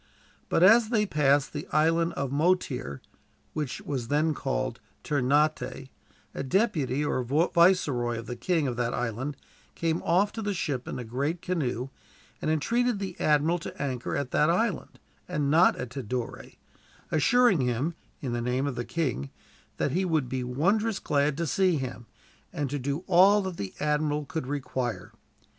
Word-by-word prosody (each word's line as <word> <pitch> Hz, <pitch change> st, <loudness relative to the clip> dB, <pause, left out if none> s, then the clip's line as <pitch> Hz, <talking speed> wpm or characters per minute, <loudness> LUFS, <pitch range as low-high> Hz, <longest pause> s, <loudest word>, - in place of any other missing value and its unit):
But 165 Hz, -, +3 dB
as 220 Hz, +3 st, +7 dB
they 215 Hz, -3 st, +2 dB
passed 145 Hz, -5 st, +2 dB
the 145 Hz, -, -5 dB
Island 165 Hz, +2 st, +2 dB
of 140 Hz, -2 st, -3 dB
Motir, 140 Hz, -, 0 dB, 0.5 s
which 150 Hz, -5 st, -3 dB
was 130 Hz, -5 st, -4 dB
then 150 Hz, +4 st, +2 dB
called -, -, -2 dB, 0.2 s
Ternate, 140 Hz, -1 st, 0 dB, 0.4 s
a -, -, -4 dB
deputy, 150 Hz, -, +1 dB
or 130 Hz, -, 0 dB
viceroy, 145 Hz, -4 st, +2 dB
of 115 Hz, -, -6 dB
the 120 Hz, -, -5 dB
king 155 Hz, +5 st, 0 dB
of 125 Hz, -2 st, -3 dB
that 120 Hz, -1 st, -1 dB
island 125 Hz, +4 st, -3 dB, 0.4 s
came 165 Hz, 0 st, 0 dB
off 190 Hz, +5 st, +2 dB
to 225 Hz, -, -5 dB
the 205 Hz, -2 st, -2 dB
ship 135 Hz, -7 st, -2 dB
in -, -, -4 dB
a 125 Hz, -, -4 dB
great 140 Hz, +9 st, -2 dB
canoe, 135 Hz, -8 st, -2 dB, 0.5 s
and -, -, -1 dB
entreated 235 Hz, +10 st, +1 dB
the 190 Hz, -3 st, -5 dB
admiral 155 Hz, +3 st, +2 dB
to -, -, -8 dB
anchor 130 Hz, -3 st, -2 dB
at 140 Hz, -3 st, -3 dB
that 150 Hz, -, +3 dB
island, 195 Hz, +4 st, 0 dB, 0.3 s
and 150 Hz, -5 st, -1 dB
not 165 Hz, +4 st, +5 dB
at 125 Hz, -1 st, -6 dB
Tidore; 125 Hz, -2 st, -5 dB, 0.6 s
assuring 195 Hz, -, +4 dB
him, 125 Hz, +6 st, 0 dB, 0.3 s
in 130 Hz, -5 st, -3 dB
the 120 Hz, -, -1 dB
name 125 Hz, +3 st, 0 dB
of 140 Hz, -, -1 dB
the 120 Hz, -1 st, -3 dB
king, 130 Hz, -, -2 dB, 0.5 s
that 140 Hz, -, 0 dB
he 180 Hz, +6 st, +1 dB
would 160 Hz, -7 st, 0 dB
be 130 Hz, +1 st, -3 dB
wondrous 195 Hz, -, +1 dB
glad 145 Hz, -3 st, 0 dB
to 170 Hz, -, -1 dB
see 185 Hz, +2 st, +2 dB
him, 120 Hz, -4 st, -6 dB, 0.4 s
and 145 Hz, -3 st, -3 dB
to 145 Hz, -, -2 dB
do 140 Hz, +6 st, -3 dB
all 195 Hz, +4 st, +5 dB
that 190 Hz, -2 st, -5 dB
the 95 Hz, -2 st, -5 dB
admiral 150 Hz, 0 st, 0 dB
could 140 Hz, -1 st, -4 dB
require. 130 Hz, -4 st, -3 dB
145 Hz, 165 wpm, -27 LUFS, 130-170 Hz, 0.6 s, as